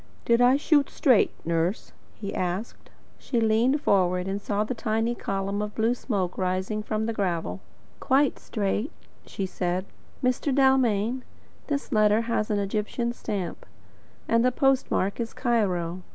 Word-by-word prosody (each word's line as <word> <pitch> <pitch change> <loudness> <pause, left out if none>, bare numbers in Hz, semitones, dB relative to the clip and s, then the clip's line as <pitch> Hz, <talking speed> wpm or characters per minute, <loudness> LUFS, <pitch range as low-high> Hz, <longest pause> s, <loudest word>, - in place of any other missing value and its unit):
"Did 235 +1 +3
I 250 +2 +6
shoot 290 -1 +3
straight, 255 -8 +4 0.2
nurse?" 170 +4 -1 0.2
he 200 -2 -6
asked. 185 +5 -4 0.3
She 240 - -1
leaned 230 +6 +2
forward 180 -5 +2
and 195 +1 -2
saw 205 0 0
the 220 - -3
tiny 225 0 0
column 195 -2 -2
of 210 0 -4
blue 225 +2 +2
smoke 200 -8 -2
rising 185 +3 -1
from 215 +1 -2
the 230 - -1
gravel. 185 -4 -2 0.4
"Quite 275 +1 +2
straight," 210 +4 -2 0.4
she 195 - -3
said. 180 0 -2 0.4
"Mr. 255 +3 +1
Dalmain, 255 -3 +3 0.5
this 285 -1 -3
letter 215 -1 +4
has 230 -2 -1
an 210 - +1
Egyptian 215 +4 -2
stamp, 200 -7 -4 0.6
and 230 0 +3
the 255 - +3
postmark 260 -7 +1
is 230 -1 -3
Cairo. 185 -8 0
215 Hz, 145 wpm, -26 LUFS, 195-240 Hz, 0.6 s, I